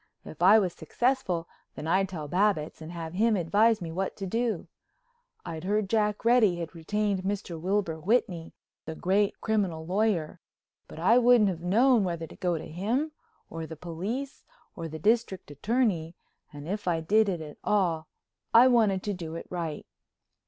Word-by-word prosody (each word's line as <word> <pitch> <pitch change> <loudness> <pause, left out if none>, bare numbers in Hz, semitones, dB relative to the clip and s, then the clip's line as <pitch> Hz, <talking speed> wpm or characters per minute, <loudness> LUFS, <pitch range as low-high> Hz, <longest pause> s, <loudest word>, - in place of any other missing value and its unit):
If 155 - -11
I 195 +5 +8
was 185 -5 +1
successful, 180 - -1 0.3
then - - -7
I'd 190 +3 +2
tell 155 -6 -6
Babbitts 180 -2 0
and 160 +1 -8
have 165 -1 -6
him 220 +4 +2
advise 205 +4 +2
me 165 - -5
what 190 +3 -3
to 195 - -5
do. 225 0 -1 0.8
I'd 165 -2 -6
heard 205 +2 0
Jack 210 -1 +1
Reddy 230 -6 +5
had 170 -1 -6
retained 200 +4 -1
Mr. 190 -4 -4
Wilbur 185 -3 -1
Whitney, 180 -3 0 0.3
the 160 - -6
great 195 +4 +1
criminal 190 -8 -1
lawyer, 185 -3 0 0.5
but - - -12
I 220 +9 +4
wouldn't 240 -4 +5
have 170 -2 -7
known 225 +6 +4
whether 170 -3 -3
to - - -13
go 175 -2 -1
to - - -7
him 230 - -1 0.4
or 165 -1 -6
the 160 - -8
police 195 - -5 0.3
or 165 -2 -5
the 160 0 -7
District 205 -2 0
Attorney 180 - 0 0.4
and 145 +1 -9
if 205 +1 -4
I 170 -2 +1
did 210 +6 +3
it 180 -3 -2
at 150 -2 -9
all 170 -6 +1 0.5
I 240 +3 +9
wanted 215 -6 +3
to 205 - -2
do 165 -3 -6
it 165 - -6
right. 165 -4 -4
185 Hz, 175 wpm, -28 LUFS, 165-215 Hz, 0.8 s, I